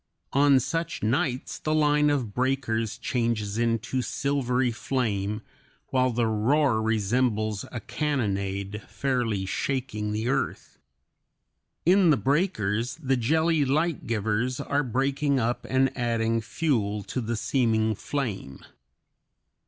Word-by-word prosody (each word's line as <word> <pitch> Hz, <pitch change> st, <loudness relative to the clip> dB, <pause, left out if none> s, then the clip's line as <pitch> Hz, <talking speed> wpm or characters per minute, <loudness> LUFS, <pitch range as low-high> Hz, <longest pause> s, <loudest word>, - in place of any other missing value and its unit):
On 140 Hz, -1 st, +5 dB
such 165 Hz, +6 st, -3 dB
nights 125 Hz, +3 st, -1 dB
the 155 Hz, 0 st, 0 dB
line 150 Hz, -1 st, +3 dB
of 130 Hz, -8 st, -1 dB
breakers 125 Hz, -4 st, 0 dB
changes 115 Hz, -3 st, -1 dB
into 115 Hz, +2 st, 0 dB
silvery 130 Hz, -2 st, 0 dB
flame, 105 Hz, -4 st, -2 dB, 0.5 s
while 130 Hz, -1 st, +2 dB
the 120 Hz, -1 st, 0 dB
roar 115 Hz, +3 st, +2 dB
resembles 110 Hz, -1 st, 0 dB
a 120 Hz, -, -4 dB
cannonade, 105 Hz, -6 st, -2 dB
fairly 120 Hz, -8 st, -1 dB
shaking 110 Hz, -1 st, -2 dB
the 110 Hz, +2 st, -2 dB
earth. 135 Hz, +2 st, -2 dB, 1.1 s
In 185 Hz, +1 st, +5 dB
the 150 Hz, -, +5 dB
breakers 130 Hz, -, 0 dB
the 135 Hz, -5 st, 0 dB
jelly 160 Hz, +5 st, +2 dB
light 155 Hz, +4 st, 0 dB
givers 115 Hz, +3 st, 0 dB
are 140 Hz, +1 st, 0 dB
breaking 135 Hz, +2 st, 0 dB
up 120 Hz, +1 st, -1 dB
and 130 Hz, 0 st, +2 dB
adding 115 Hz, -1 st, 0 dB
fuel 105 Hz, -4 st, -1 dB
to 130 Hz, -, -3 dB
the 115 Hz, +1 st, -2 dB
seeming 110 Hz, -3 st, +1 dB
flame. 105 Hz, -, -4 dB
125 Hz, 115 wpm, -26 LUFS, 110-140 Hz, 1.1 s, On